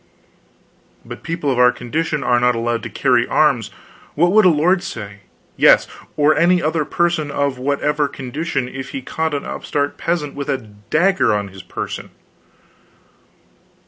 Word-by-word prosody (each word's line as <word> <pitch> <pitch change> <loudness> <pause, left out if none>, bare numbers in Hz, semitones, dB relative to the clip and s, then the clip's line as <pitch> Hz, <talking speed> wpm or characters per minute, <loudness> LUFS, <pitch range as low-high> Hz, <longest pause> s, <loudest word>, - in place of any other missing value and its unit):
"But - - -9
people 165 -4 -2
of 125 - -1
our 125 0 +6
condition 150 +4 -3
are 120 0 +3
not 125 0 +2
allowed 115 0 -1
to 115 - -6
carry - - +2
arms. - - +2 0.5
What 175 +4 +3
would 215 0 +5
a - - +8
lord 175 +4 +2
say 105 - -7 0.4
yes, - - +6 0.3
or 150 +1 +4
any 175 +3 +4
other 155 -1 0
person 170 -3 0
of 140 -2 -1
whatever 145 +2 0
condition 135 0 -4
if 135 +1 -7
he 135 - -7
caught 160 +2 -2
an 140 - -4
upstart 145 0 -3
peasant 165 -4 -2
with 140 0 -6
a 135 - +1
dagger 125 - 0
on 100 -1 -3
his 95 0 -11
person?" 90 - -6
145 Hz, 155 wpm, -19 LUFS, 125-160 Hz, 0.5 s, a